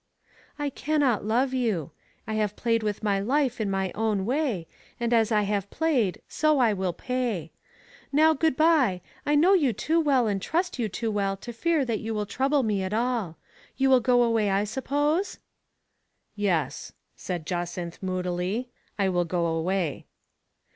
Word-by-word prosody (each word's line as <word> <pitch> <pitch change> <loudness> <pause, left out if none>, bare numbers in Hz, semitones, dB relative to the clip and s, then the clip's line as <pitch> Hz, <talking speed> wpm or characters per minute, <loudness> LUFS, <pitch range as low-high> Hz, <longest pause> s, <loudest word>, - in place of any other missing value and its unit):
" - - -28
I 290 -1 -2
cannot 275 -7 0
love 250 +5 +1
you. 215 - -1 0.3
I 220 - -4
have 210 -1 0
played 230 -1 +1
with 210 -1 -3
my 200 -2 +1
life 250 +2 0
in 210 - -1
my 190 -1 -1
own 210 -3 0
way, 245 - -1 0.3
and 235 0 0
as 225 -1 +3
I 210 -1 +3
have 200 -1 -1
played 255 - 0
so 310 -1 +2
I 235 -5 +4
will 190 -2 -1
pay. 225 - -3 0.6
Now, 310 +3 +5
good 315 -2 +1
by, 295 - +3 0.3
I 295 - +3
know 340 +7 +5
you 290 -11 +3
too 320 +10 +1
well 275 -6 +3
and 200 -3 -1
trust 345 - -1
you 225 -3 0
too 225 +3 -2
well 195 -2 -1
to 240 +5 -8
fear 315 +3 +1
that 230 -4 -1
you 225 0 -4
will 210 -1 -1
trouble 270 +6 +1
me 210 -3 0
at 190 +2 -3
all. 230 -8 -1 0.4
You 270 0 +3
will 260 - +7
go 245 0 +3
away, 225 -3 +2
I 195 +1 +2
suppose? 290 - -1 0.3
" - - -50
" - - -51 0.2
Yes," 170 -9 -1 0.2
said 175 -4 -5
Jacynth 175 0 -4
moodily, 185 +5 -2
" - - -40
I 200 -2 +2
will 175 -2 +1
go 170 0 -1
away." 165 0 -1
220 Hz, 180 wpm, -26 LUFS, 195-265 Hz, 0.6 s, will